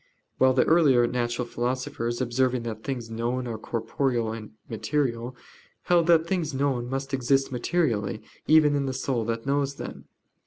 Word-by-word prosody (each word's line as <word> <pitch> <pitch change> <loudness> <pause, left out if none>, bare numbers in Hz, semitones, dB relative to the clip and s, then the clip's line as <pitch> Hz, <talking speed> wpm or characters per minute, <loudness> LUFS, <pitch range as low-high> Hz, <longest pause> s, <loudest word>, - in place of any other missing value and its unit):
While 130 0 +5
the 130 - +4
earlier 145 -7 +5
natural 120 0 -1
philosophers, 120 -1 -2
observing 125 0 +1
that 110 -1 -5
things 120 -4 -4
known 120 +3 -2
are 115 -2 -4
corporeal 115 +1 -1
and 110 -2 -8
material, 120 0 -2 0.5
held 170 -2 +3
that 165 -2 +5
things 170 -5 -1
known 130 -3 0
must 135 +1 -4
exist 135 +1 +2
materially 120 - 0 0.2
even 155 -1 +6
in 140 -1 0
the 130 - -2
soul 130 -3 -1
that 115 0 -3
knows 140 0 0
them. - - -8
130 Hz, 155 wpm, -26 LUFS, 120-140 Hz, 0.5 s, even